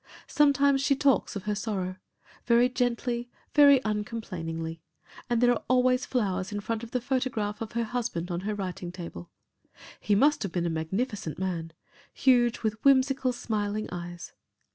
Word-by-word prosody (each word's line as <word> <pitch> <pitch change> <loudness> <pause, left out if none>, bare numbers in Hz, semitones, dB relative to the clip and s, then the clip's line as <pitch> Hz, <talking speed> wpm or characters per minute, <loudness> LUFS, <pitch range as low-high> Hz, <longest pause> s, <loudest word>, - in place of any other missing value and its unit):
Sometimes 280 -1 +3
she 275 0 +3
talks 275 -5 +2
of 200 - -4
her 210 +1 -1
sorrow 195 -3 -3 0.5
very 235 +1 +5
gently, 245 -1 -1 0.2
very 285 -2 +7
uncomplainingly, 175 -7 -4 0.5
and 240 -1 +2
there 245 0 +5
are 240 - 0
always 255 0 +3
flowers 190 -6 -1
in 205 - -3
front 220 +2 -3
of 230 - -7
the 250 - -1
photograph 245 -5 -2
of 225 0 -5
her 235 0 0
husband 225 -7 -3
on 175 - -1
her 210 +3 -3
writing 185 -2 -5
table. 170 - -8 0.7
He 205 - +1
must 290 +8 +4
have 195 - -3
been 175 -1 -1
a 170 - 0
magnificent 190 - -3
man 170 -3 -3 0.4
huge, 245 -3 +3
with 220 0 -2
whimsical 270 -1 +4
smiling 215 -3 -2
eyes. 175 0 -7
220 Hz, 160 wpm, -28 LUFS, 185-250 Hz, 0.7 s, very